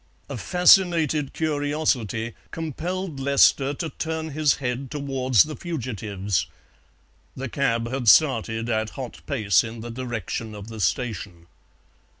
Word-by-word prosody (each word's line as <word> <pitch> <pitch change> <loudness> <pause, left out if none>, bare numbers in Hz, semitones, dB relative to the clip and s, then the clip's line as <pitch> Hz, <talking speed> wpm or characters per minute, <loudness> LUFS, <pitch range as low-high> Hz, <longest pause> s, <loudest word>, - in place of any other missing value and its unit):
A - - -4
fascinated 170 -5 +4
curiosity 145 - -1 0.2
compelled 165 +1 -4
Lester 140 0 +4
to 160 +1 -4
turn 160 -1 -3
his 150 -1 +2
head 130 0 -3
towards 135 -4 +2
the 155 0 -6
fugitives; 105 - -3 0.9
the 135 +1 -4
cab 115 -3 0
had 125 -2 +1
started 115 -6 +4
at 110 -2 0
hot 130 -3 -7
pace 105 - +3
in 115 0 -7
the 120 +1 -6
direction 115 -3 -4
of 105 +1 -9
the 110 -1 -8
station. 90 -2 -2
130 Hz, 125 wpm, -24 LUFS, 110-150 Hz, 0.9 s, fascinated